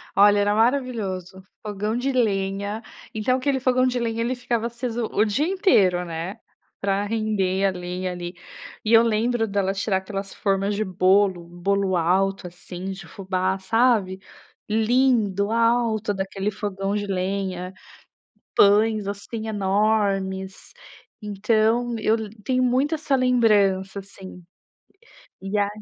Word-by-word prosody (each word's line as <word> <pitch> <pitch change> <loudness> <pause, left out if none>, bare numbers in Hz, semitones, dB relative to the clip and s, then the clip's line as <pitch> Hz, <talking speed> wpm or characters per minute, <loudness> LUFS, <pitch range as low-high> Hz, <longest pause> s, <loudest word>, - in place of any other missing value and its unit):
Olha 205 +1 +6
era 205 +1 +2
maravilhoso, 215 -7 -1 0.2
fogão 210 +1 -3
de 265 +3 -1
lenha, 200 -2 -1 0.3
então 235 +4 +1
aquele 265 0 0
fogão 255 0 +2
de 250 -1 0
lenha, 230 -1 -2
ele 250 +2 -1
ficava 240 -2 -2
aceso 235 -1 -3
o 210 - +3
dia 270 +10 0
inteiro, 210 - +3
né, 170 +5 -5 0.4
pra 200 0 0
render 205 -3 0
a 195 - +3
lenha 180 +1 -4
ali. 175 0 -6 0.5
E 220 +1 +1
eu 225 +1 +8
lembro 230 +1 +1
dela 195 -1 0
tirar 195 0 0
aquelas 195 +1 -6
formas 195 0 0
de 215 - 0
bolo, 185 -1 +2
bolo 190 +2 0
alto, 185 +3 +1
assim, 180 +1 -9
de 190 - -9
fubá 190 0 -2
sabe. 220 -2 +2 0.5
Lindo, 220 -3 +2
alto, 230 -2 +1
daquele 195 +1 -3
fogão 200 0 -3
de 205 0 -2
lenha, 185 -1 -3 0.8
pães, 210 +1 +4
assim, 210 +2 -5
enormes. 195 - -1 0.5
Então 220 +3 +1
eu 215 +1 +2 0.3
tenho 255 +1 +1
muito 265 +6 +2
essa 295 -3 0
lembrança 205 -7 +2
assim. 190 -2 -11 1.0
E 195 +2 -3
ai 200 0 +2
205 Hz, 130 wpm, -23 LUFS, 190-230 Hz, 1.0 s, eu